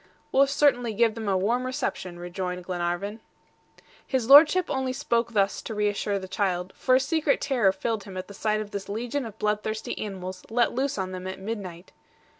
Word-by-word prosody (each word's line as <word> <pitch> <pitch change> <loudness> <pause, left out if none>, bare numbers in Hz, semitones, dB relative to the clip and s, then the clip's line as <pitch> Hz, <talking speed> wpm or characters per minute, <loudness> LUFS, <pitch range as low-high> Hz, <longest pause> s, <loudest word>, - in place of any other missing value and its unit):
"We'll 275 +1 +5
certainly 245 -5 +2
give 230 0 +3
them 220 -2 -4
a 190 - +2
warm 230 +7 +1
reception," 255 -9 -3
rejoined 180 +1 -4
Glenarvan. 175 +4 -3 0.8
His 255 -4 -1
Lordship 305 +6 +8
only 265 -1 -1
spoke 235 -2 0
thus 200 -1 +1
to 220 - -6
reassure 205 -1 0
the 190 -1 -6
child, 185 -1 -1
for 255 - +3
a - - +5
secret 305 +1 +1
terror 240 -8 +2
filled 220 +2 -3
him 190 -2 -8
at 185 - -5
the 200 - -10
sight 215 +1 0
of 210 -1 -7
this 200 -1 -5
legion 240 +5 -2
of 220 - -11
bloodthirsty 215 +1 -2
animals 185 -3 -6
let 240 +2 +2
loose 270 +1 -1
on 190 -1 -2
them 185 0 -6
at 190 - -5
midnight. 190 -4 -6
210 Hz, 190 wpm, -26 LUFS, 190-245 Hz, 0.8 s, Lordship